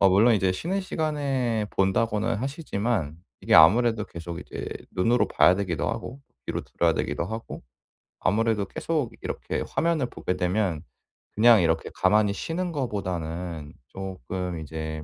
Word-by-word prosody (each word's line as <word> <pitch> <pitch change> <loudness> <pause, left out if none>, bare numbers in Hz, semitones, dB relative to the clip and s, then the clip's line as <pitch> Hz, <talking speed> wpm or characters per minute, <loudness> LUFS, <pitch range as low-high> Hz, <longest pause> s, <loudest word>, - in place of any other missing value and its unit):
어 95 - +6
물론 110 +5 +5
이제 95 -2 +2
쉬는 175 - -2
시간에 135 - -1
본다고는 105 +2 +1
하시지만 115 - -2 0.2
이게 - - +2
아무래도 110 +6 +6
계속 85 -1 -7
이제 - - -6 0.2
눈으로 115 +7 +2
봐야 90 - +5
되기도 90 -4 -2
하고 115 +4 -5 0.3
귀로 - - -2
들어야 - - +1
되기도 85 - -2
하고. 110 +4 -6 0.6
아무래도 110 0 +2
계속 150 +3 -2
이렇게 - - -3
화면을 165 -5 +1
보게 90 -6 -4
되면 90 -3 0 0.5
그냥 115 -1 +6
이렇게 80 -1 +1
가만히 105 +1 +3
쉬는 170 - -3
거보다는 90 - -4 0.2
쪼끔 90 -1 -5
이제 80 0 -5
105 Hz, 325 characters per minute, -26 LUFS, 90-120 Hz, 0.6 s, 어